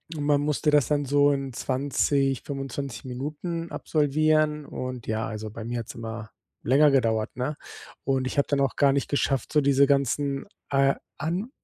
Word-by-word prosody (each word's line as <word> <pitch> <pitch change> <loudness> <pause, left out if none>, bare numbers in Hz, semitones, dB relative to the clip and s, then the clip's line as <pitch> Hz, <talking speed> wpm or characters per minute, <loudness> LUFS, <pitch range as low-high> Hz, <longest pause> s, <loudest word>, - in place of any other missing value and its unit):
Und 145 - -3
man 145 0 +3
musste 150 +1 +1
das 145 -5 +4
dann 145 -1 +1
so 145 +1 +4
in 135 -1 -2
20, 135 +1 0
25 135 -3 -5
Minuten 155 +6 -4
absolvieren. 155 0 +1
Und, 130 -2 -6
ja, 110 +1 -1
also 110 0 -5
bei 110 +2 -8
mir 120 0 -3
hat's 115 - -7
immer 115 -1 -6 0.3
länger 140 +4 +5
gedauert, 115 -5 +1
ne? 130 +4 -3 0.5
Und 135 -1 0
ich 130 - -5
habe 140 - +3
dann 140 -1 +1
auch 135 -1 +1
gar 140 -1 +4
nicht 140 - 0
geschafft, 135 -3 0
so 150 - +4
diese 140 0 +4
ganzen, 140 0 +1 0.2
äh, 135 -1 +3 0.2
An 180 +10 -2
140 Hz, 175 wpm, -26 LUFS, 130-145 Hz, 0.5 s, länger